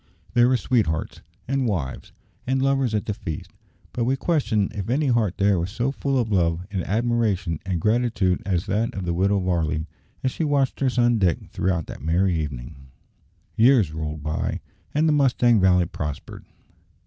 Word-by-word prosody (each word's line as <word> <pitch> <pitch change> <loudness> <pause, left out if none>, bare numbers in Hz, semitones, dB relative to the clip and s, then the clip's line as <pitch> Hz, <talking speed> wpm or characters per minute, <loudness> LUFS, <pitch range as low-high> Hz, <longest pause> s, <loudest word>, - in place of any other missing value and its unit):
There 120 0 +5
were 130 0 +3
sweethearts, 110 -11 -1 0.3
and 135 -1 0
wives, 75 - -3 0.4
and 130 +1 +1
lovers 135 -4 +1
at 105 - -1
the 105 - -2
feast, 80 -6 -6 0.4
but 120 - -1
we 130 +3 +1
question 125 - 0
if 100 0 -5
any 145 +5 +1
heart 115 -6 +1
there 100 -3 +3
was 85 +2 -2
so 120 +6 -1
full 135 0 -1
of 115 -3 0
love, 85 -2 +1
and 95 -3 -2
admiration, 105 -7 0
and 90 -3 -1
gratitude, 105 -3 +1
as 90 -3 -1
that 110 +4 -1
of 95 -2 -4
the 85 - -1
Widow 100 +4 +2
Varley 80 -3 0 0.4
as 130 - +1
she 165 - -3
watched 140 -3 +1
her 135 - +2
son 120 -2 +2
Dick 90 -4 0
throughout 90 -3 -1
that - - -9
merry 90 +5 +1
evening. 70 -3 -5 0.7
Years 115 - +4
rolled 75 -1 -5
by, 75 +1 -2 0.3
and 155 +2 +2
the 155 - +3
Mustang 125 -5 +3
Valley 90 -1 +4
prospered. 75 -3 -6
100 Hz, 175 wpm, -24 LUFS, 85-125 Hz, 0.7 s, There